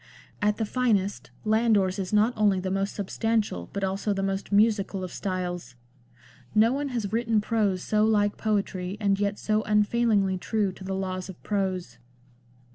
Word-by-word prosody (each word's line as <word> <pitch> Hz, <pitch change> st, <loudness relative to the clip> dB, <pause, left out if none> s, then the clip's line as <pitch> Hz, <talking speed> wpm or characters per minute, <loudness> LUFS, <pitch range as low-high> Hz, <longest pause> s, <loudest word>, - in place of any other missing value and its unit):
At 210 Hz, 0 st, +2 dB
the 225 Hz, -, 0 dB
finest 205 Hz, -4 st, 0 dB, 0.2 s
Landor's 215 Hz, -3 st, +2 dB
is 185 Hz, -2 st, -3 dB
not 215 Hz, +3 st, +3 dB
only 205 Hz, -3 st, +3 dB
the 185 Hz, 0 st, -3 dB
most 195 Hz, +1 st, -1 dB
substantial 205 Hz, -, -1 dB
but 200 Hz, -, -4 dB
also 195 Hz, +2 st, 0 dB
the 195 Hz, 0 st, -2 dB
most 195 Hz, +1 st, -2 dB
musical 200 Hz, -2 st, +2 dB
of 180 Hz, -, -6 dB
styles. 180 Hz, -8 st, -4 dB, 0.8 s
No 225 Hz, +3 st, +5 dB
one 285 Hz, +1 st, -1 dB
has 220 Hz, -5 st, -3 dB
written 230 Hz, -1 st, +2 dB
prose 225 Hz, +2 st, -2 dB
LANDOR. 200 Hz, -3 st, +2 dB
xxi 180 Hz, -, -10 dB
so 215 Hz, 0 st, +3 dB
like 205 Hz, -2 st, +2 dB
poetry 200 Hz, -3 st, -2 dB
and 200 Hz, -2 st, +1 dB
yet 205 Hz, 0 st, 0 dB
so 215 Hz, 0 st, 0 dB
unfailingly 210 Hz, -2 st, +2 dB
true 210 Hz, -1 st, 0 dB
to 185 Hz, -, -12 dB
the 190 Hz, 0 st, -3 dB
laws 185 Hz, -1 st, -3 dB
of 185 Hz, -, -9 dB
prose. 185 Hz, -, -2 dB
205 Hz, 175 wpm, -26 LUFS, 190-215 Hz, 0.8 s, No